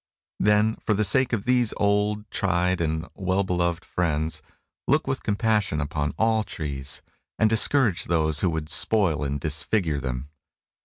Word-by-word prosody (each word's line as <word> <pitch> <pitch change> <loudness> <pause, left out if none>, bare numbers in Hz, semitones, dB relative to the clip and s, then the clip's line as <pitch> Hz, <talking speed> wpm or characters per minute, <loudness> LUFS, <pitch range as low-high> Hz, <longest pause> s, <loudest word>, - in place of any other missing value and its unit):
Then, 105 +1 +3
for 105 - -1
the 105 - +1
sake 130 +4 +3
of 110 -5 -2
these 125 -2 +2
old, 105 +1 +1
tried, 90 -1 0
and 80 +1 -2
well 95 +1 0
beloved 85 -2 -1
friends, 80 -2 -1 0.5
look - - +2
with - - -2
compassion 105 -5 0
upon 75 0 -2
all 110 0 +2
trees, 70 -7 -4 0.3
and 110 - +4
discourage 110 -2 +2
those 80 -3 +1
who 90 - +1
would 80 -2 -4
spoil 95 -10 +2
and 70 0 -2
disfigure 75 +2 0
them. 65 +1 -4
90 Hz, 150 wpm, -25 LUFS, 75-105 Hz, 0.5 s, and